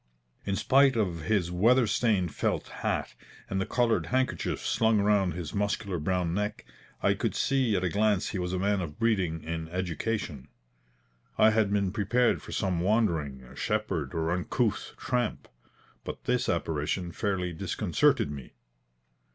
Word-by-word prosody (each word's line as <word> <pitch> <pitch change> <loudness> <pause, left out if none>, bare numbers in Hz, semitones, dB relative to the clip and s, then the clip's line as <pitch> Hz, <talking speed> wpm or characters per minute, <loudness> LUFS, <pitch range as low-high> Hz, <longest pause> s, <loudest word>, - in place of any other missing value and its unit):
In 100 - +1
spite 135 +4 +4
of 90 -8 -1
his 100 -5 +1
weather 115 +8 +4
stained 100 -7 +1
felt - - -1
hat, - - -1 0.3
and 95 0 -1
the - - -2
coloured 120 -2 +1
handkerchief 130 +1 -1
slung 110 -1 +3
round 100 -4 +2
his 85 -4 -5
muscular 100 -3 -1
brown 90 +1 0
neck, 105 +2 -2 0.4
I - - +4
could - - -2
see 130 -6 +2
at 95 - 0
a 90 - +1
glance 105 +1 +1
he 95 - -3
was 90 0 -2
a 95 - -1
man 100 +1 +1
of 80 -2 -6
breeding 95 -9 0
and 80 0 -4
education. 90 - -3 0.9
I 110 - +6
had 110 -2 +2
been 100 -2 +1
prepared 115 +4 +1
for - - -10
some 95 -4 0
wandering 85 - 0
shepherd 95 - -2
or 80 0 0
uncouth 105 +6 -1
tramp, 125 -3 -2 0.6
but - - -7
this 125 0 0
apparition 85 +1 -1
fairly 90 -2 -2
disconcerted 80 -2 +1
me. 70 -3 -9
95 Hz, 150 wpm, -28 LUFS, 85-110 Hz, 0.9 s, I